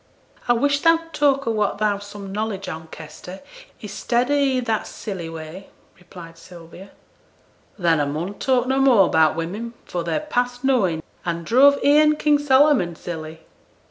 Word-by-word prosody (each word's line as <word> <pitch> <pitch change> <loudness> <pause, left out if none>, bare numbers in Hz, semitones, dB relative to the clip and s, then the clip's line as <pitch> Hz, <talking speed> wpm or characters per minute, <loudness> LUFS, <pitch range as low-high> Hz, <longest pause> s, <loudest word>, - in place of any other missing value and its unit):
'I 240 - +4
wish 285 +4 +1
thou'd 330 +1 +2
talk 275 -2 +2
of 230 - 0
what 210 -2 -1
thou's 205 -1 -1
some 205 -1 -9
knowledge 205 -1 -4
on, 160 0 -7
Kester, 160 +4 -11 0.4
i'stead 240 +5 -1
of - - +3
i' 270 -2 +1
that 225 -3 -2
silly 185 -6 -7
way,' 165 +4 -9 0.3
replied 170 -2 -13
Sylvia. 175 +2 -13 0.9
'Then 170 -5 +2
a 145 - 0
mun 160 +7 -4
talk 255 -2 +1
no 265 +1 0
more 245 -8 +4
'bout 160 -1 +3
women, 205 +9 -5
for 175 -1 -4
they're 165 -1 -1
past 245 -4 -2
knowin', 195 -12 +1 0.2
an' 170 -1 -3
druv 275 - +5
e'en 300 +1 +5
King 300 -1 +2
Solomon 265 - +3
silly.' 160 -1 -8
205 Hz, 160 wpm, -21 LUFS, 170-265 Hz, 0.9 s, druv